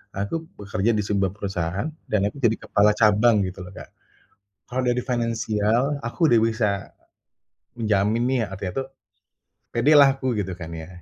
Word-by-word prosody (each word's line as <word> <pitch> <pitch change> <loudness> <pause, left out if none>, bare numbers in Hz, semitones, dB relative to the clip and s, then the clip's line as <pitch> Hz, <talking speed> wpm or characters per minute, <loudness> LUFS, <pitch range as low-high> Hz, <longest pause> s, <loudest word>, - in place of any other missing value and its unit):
Aku 100 +12 -3 0.2
bekerja 105 +2 0
di - - 0
sebuah 100 -2 0
perusahaan 95 - -3 0.2
dan 100 -1 +2
aku 140 - -7
jadi 110 -1 +4
kepala 105 +1 +4
cabang 110 +1 +4
gitu 95 0 -8
loh, 90 - -11
Kak. - - -10 0.8
Kalau 130 +1 -1
dari 125 0 +1
finansial 115 +1 0
aku 155 +8 +1
udah 115 - +5
bisa 110 -2 +1 1.1
menjamin 105 +1 +1
nih, 130 -2 +1
artinya 95 +6 -4
tuh - - -15 0.9
pedelah 140 +4 +6
aku 130 -2 -2
gitu 95 -2 -2
kan 85 -2 -8
ya, 80 +1 -7
110 Hz, 150 wpm, -23 LUFS, 100-120 Hz, 1.1 s, pedelah